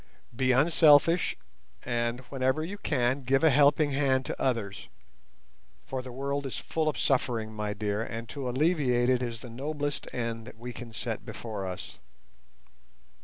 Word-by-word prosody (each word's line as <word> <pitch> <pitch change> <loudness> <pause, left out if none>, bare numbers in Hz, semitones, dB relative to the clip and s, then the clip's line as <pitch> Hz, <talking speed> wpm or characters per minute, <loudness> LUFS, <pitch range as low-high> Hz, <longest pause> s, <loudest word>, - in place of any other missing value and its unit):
Be 130 +1 +2
unselfish, 155 +4 +5 0.5
and 120 0 -1
whenever 130 +3 0
you 200 +5 -6
can, 130 -4 +1
give 135 +3 +2
a 160 - +6
helping 145 +2 +4
hand 135 -2 +2
to - - -5
others—for 115 +3 -6
the 125 0 -9
world 140 +2 -2
is 130 - -5
full 160 -1 -1
of - - -3
suffering, 115 -5 0
my 105 -1 -3
dear, 105 0 -1
and 115 0 -5
to 135 -3 -4
alleviate 130 -3 +2
it 130 -1 +3
is 115 -3 -4
the 125 - -9
noblest 145 +3 -3
end 115 -1 -3
that - - -11
we 120 +2 -7
can 120 -2 -9
set 110 - -4
before 105 -5 -5
us. 90 - -7
130 Hz, 155 wpm, -29 LUFS, 115-145 Hz, 0.5 s, a